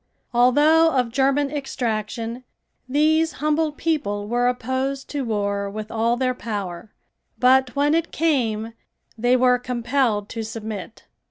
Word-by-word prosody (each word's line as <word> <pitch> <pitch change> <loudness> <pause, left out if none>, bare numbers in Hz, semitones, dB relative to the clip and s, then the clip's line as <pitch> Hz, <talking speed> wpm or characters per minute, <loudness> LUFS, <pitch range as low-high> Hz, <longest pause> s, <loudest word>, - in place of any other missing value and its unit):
Although 295 +7 +5
of 250 -3 +1
German 275 +2 +1
extraction, 235 -4 -3 0.5
these 315 +3 +2
humble 305 +2 0
people 205 -11 -2
were 245 +2 +1
opposed 260 +2 -2
to 290 - -2
war 200 -3 -1
with 215 +1 -7
all 230 +2 +1
their 255 0 0
power, 205 -4 -5 0.5
but 255 -1 +3
when 290 +1 +2
it 330 +1 0
came 230 -9 0 0.4
they 245 +2 +2
were 250 0 +4
compelled 240 -3 0
to 225 - -5
submit. 220 -1 -7
250 Hz, 125 wpm, -22 LUFS, 220-280 Hz, 0.5 s, Although